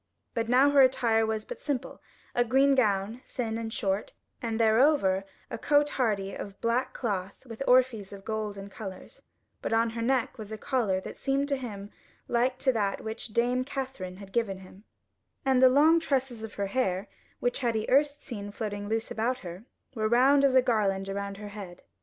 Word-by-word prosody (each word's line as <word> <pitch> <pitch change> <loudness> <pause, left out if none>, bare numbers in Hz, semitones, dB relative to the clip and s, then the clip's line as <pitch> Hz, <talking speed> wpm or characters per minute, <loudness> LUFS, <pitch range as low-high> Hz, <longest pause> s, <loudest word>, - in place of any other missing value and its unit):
But 230 0 -2
now 265 +3 +5
her 285 -1 +6
attire 230 -4 +3
was 220 -1 -2
but - - -7
simple; 270 -3 -4 0.3
a 245 - +3
green 270 +4 +4
gown, 215 -2 +1
thin 225 -2 -3
and 225 -1 -4
short, 195 -1 -2 0.3
and 230 -1 -2
thereover 220 -4 +3 0.3
a - - -4
cote 290 0 +3
hardy 205 -6 0
of 200 -1 -7
black 240 +3 0
cloth 200 -2 -4
with 230 0 -9
orphreys 250 -6 +3
of 195 -1 -10
gold 215 -2 -3
and 200 0 -8
colours: 190 -3 -9 0.4
but - - -2
on 225 0 +2
her 230 0 -4
neck 245 -1 0
was 215 -1 -7
a 220 - -4
collar 215 -6 0
that - - -9
seemed 275 +1 0
to 280 - +2
him 210 -6 -7 0.4
like 250 +2 +1
to 260 0 +2
that 205 -3 -1
which 220 +2 -5
Dame 240 +3 +1
Katherine 260 -10 -5
had 195 -1 -12
given 225 -5 0
him; 190 +2 -15 0.6
and 260 -1 +3
the 260 - +8
long 305 +5 +5
tresses 265 -6 -1
of 220 -1 -7
her 200 - -1
hair, 195 -3 -1 0.3
which 245 - 0
he 250 - -1
had 230 -1 +1
erst 290 +2 +2
seen 205 -6 -6
floating 205 -1 -4
loose 225 +1 -1
about 240 +3 0
her, 175 +5 -8 0.3
were 215 -3 -1
wound 270 +4 +5
as 270 -2 +4
a 260 - +6
garland 195 -5 +1
around 200 0 -4
her 210 0 -8
head. 195 -4 -9
225 Hz, 195 wpm, -28 LUFS, 200-255 Hz, 0.6 s, the